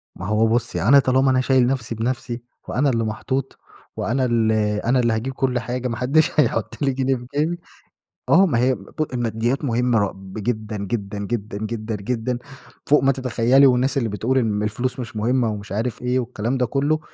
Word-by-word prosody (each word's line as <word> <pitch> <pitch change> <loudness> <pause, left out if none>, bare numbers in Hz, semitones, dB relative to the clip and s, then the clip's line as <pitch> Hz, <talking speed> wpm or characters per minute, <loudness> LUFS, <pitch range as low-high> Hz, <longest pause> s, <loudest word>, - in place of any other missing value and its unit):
ما 95 - -7
هو 110 +1 +3
بُصّي 115 +1 0
أنا 140 +7 +6
طالما 130 0 +3
أنا 130 - +3
شايل 130 -2 +3
نفْسي 120 -3 -2
بنفْسي 120 +1 -3 0.3
وأنا 140 +2 +1
اللي 115 -2 0
محطوط 130 +5 -3 0.4
وأنا 130 +3 0
ال 115 -2 +2 0.3
أنا 125 +2 +3
اللي 120 -2 +2
هاجيب 120 +5 -2
كلّ 130 -2 0
حاجة، 125 +1 -3
ما 115 -2 -3
حدّش 140 +6 +2
هيحُط 150 - 0
لي 140 - +2
جنيه 135 0 +1
في 125 -1 -8
جيبي، 165 +4 0 0.7
آه 195 - +6
ما 145 -10 +1
هي 125 +2 +3
ب 100 +9 -4
الماديّات 120 +2 -1
مهمّة 120 -2 +2
ر 100 -2 0 0.3
جدًا، 110 -1 -3
جدًا، 100 0 -4
جدًا، 100 0 -4
جدًا، 110 0 -4
جدًا 120 +4 -2 0.5
فوق 150 -2 +4
ما 135 - +5
تتخيّلي، 130 +1 +3
والناس 130 +2 +2
اللي 120 -4 0
بتقول 115 +6 0
إن 105 -4 0
الفلوس 120 +5 -2
مش 110 -4 -7
مهمّة 120 +2 +1
ومش 105 -2 -6
عارف 115 +3 -3
إيه 125 +1 +1
والكلام 120 +1 -2
ده 125 - +2
كلّه، 145 +5 +1
120 Hz, 190 wpm, -22 LUFS, 110-130 Hz, 0.7 s, أنا